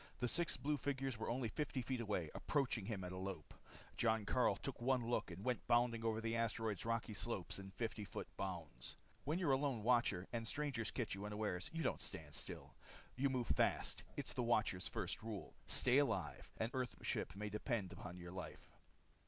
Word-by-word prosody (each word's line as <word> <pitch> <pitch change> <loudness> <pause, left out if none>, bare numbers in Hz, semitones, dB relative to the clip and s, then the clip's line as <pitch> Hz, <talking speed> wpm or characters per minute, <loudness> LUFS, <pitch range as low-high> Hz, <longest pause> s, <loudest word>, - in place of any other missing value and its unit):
The 125 - +2
six 170 +7 +2
blue 150 +1 +1
figures 135 -4 -1
were - - -1
only 120 0 +1
fifty 130 +2 -1
feet 125 0 -1
away, 100 -8 -1
approaching 130 -8 +1
him 105 -5 -2
at 90 - -4
a 95 - -4
lope. 95 -5 -4 0.4
Jon 110 -2 +3
Karyl 125 +4 +4
took 135 -3 -4
one 125 -1 +3
look 120 - +1
and 90 +4 -7
went 125 -2 0
bounding 120 -1 +4
over 110 -1 +2
the 115 0 0
asteroid's 115 -2 0
rocky 115 -1 0
slopes 100 -4 -1
in 95 0 -7
fifty 110 +1 -2
foot 100 - -5
bounds. 80 -10 -4 0.3
When 150 +4 +2
you're 175 -6 +3
a 135 - +6
Lone 135 -6 0
Watcher, 115 -6 +3
and 115 -1 -1
strangers 140 -6 0
catch 120 -5 -1
you 100 +1 -4
unawares, 105 -4 -1
you 165 0 -1
don't 130 - +1
stand 75 -2 -4
still. - - -3 0.4
You 135 +2 +3
move 125 -2 +1
fast. - - +2 0.2
It's - - -2
the - - 0
Watcher's 110 -6 +2
first - - -2
rule. 110 -3 -5
Stay 125 +3 +7
alive. 145 - 0
An 115 +2 0
Earthship 125 -7 -1
may 105 +1 -3
depend 105 -2 -1
upon 90 0 -7
your 85 0 -7
life. 95 0 -7
115 Hz, 195 wpm, -41 LUFS, 100-125 Hz, 0.4 s, Stay